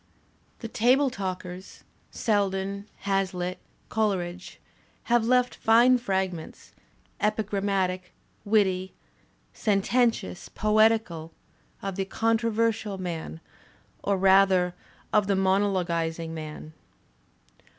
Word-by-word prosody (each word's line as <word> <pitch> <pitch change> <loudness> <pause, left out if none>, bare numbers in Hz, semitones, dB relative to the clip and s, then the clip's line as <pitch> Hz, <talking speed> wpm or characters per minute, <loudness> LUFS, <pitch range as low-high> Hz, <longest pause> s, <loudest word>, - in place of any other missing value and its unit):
The 230 - -4
table 255 +5 +3
talkers, 185 -2 -6 0.3
Selden, 200 -2 -1 0.2
HazUtt, 185 -2 -1 0.3
Col 215 -2 +1
eridge 180 0 -6 0.5
have 240 -1 +2
left 250 0 +3
fine 240 +3 +4
fragments, 190 -6 -3 0.5
epigrammatic, 195 -3 -1 0.3
witty; 190 -3 +1 0.6
sen 200 -3 +1
tentious, 225 - 0
poetical, 215 -6 +2 0.5
of 195 -1 -4
the 195 - -1
conversational 225 -1 0
man 165 -3 -5 0.6
or 200 -1 +1
rather 190 -1 +4 0.4
of 210 -2 +3
the 200 - +2
monologuizing 180 -4 0
man. 155 -1 -8
195 Hz, 90 wpm, -26 LUFS, 180-220 Hz, 0.6 s, fine